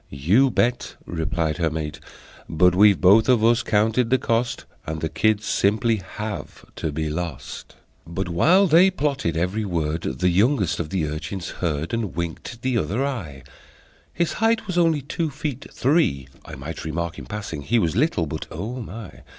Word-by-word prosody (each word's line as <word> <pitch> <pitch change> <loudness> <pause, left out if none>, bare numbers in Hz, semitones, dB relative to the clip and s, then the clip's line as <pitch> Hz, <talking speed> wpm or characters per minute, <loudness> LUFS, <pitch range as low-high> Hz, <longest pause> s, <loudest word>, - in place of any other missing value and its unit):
"You 95 - +3
bet!" 120 0 0
replied 80 -2 -2
her 85 -2 +2
mate: 80 -1 -4 0.5
"But 90 +2 +4
we've 100 +1 +5
both 105 +6 +5
of 120 -4 +4
us 120 +1 +4
counted 110 +2 +1
the 130 - +4
cost, 115 0 -1 0.2
And 80 0 -3
the 80 - -2
kids 105 +6 +1
simply 110 +3 +2
have 105 +2 -7
to 80 - -2
be 80 +1 -2
lost!" 80 0 -6 0.3
But, 90 +3 -3
while 170 - +4
they 175 +2 +6
plotted, 140 - -1
every 90 +6 -1
word 80 -4 -1
The 65 +8 0
youngest 100 - +2
of 80 -3 -3
the 90 -3 -1
urchins 80 +5 -5
heard, 80 0 -3
And 115 -5 -2
winked 85 +8 -5
the 130 -3 +1
other 105 - -1
eye; 85 - -5 0.7
His 170 -1 -1
height 225 0 +2
was 185 -4 -4
only 165 -5 +2
two 160 +3 -2
feet 140 -2 -5
three. 120 - +1 0.2
(I - - -8
might 75 +5 -7
remark, 85 +1 -3
in - - -10
passing, 100 -8 -5
he 115 +12 +1
Was 85 -6 +1
little, 120 - +1
but 75 - -5
O 110 +10 -5
My!) 105 -4 -9
100 Hz, 175 wpm, -23 LUFS, 80-125 Hz, 0.7 s, they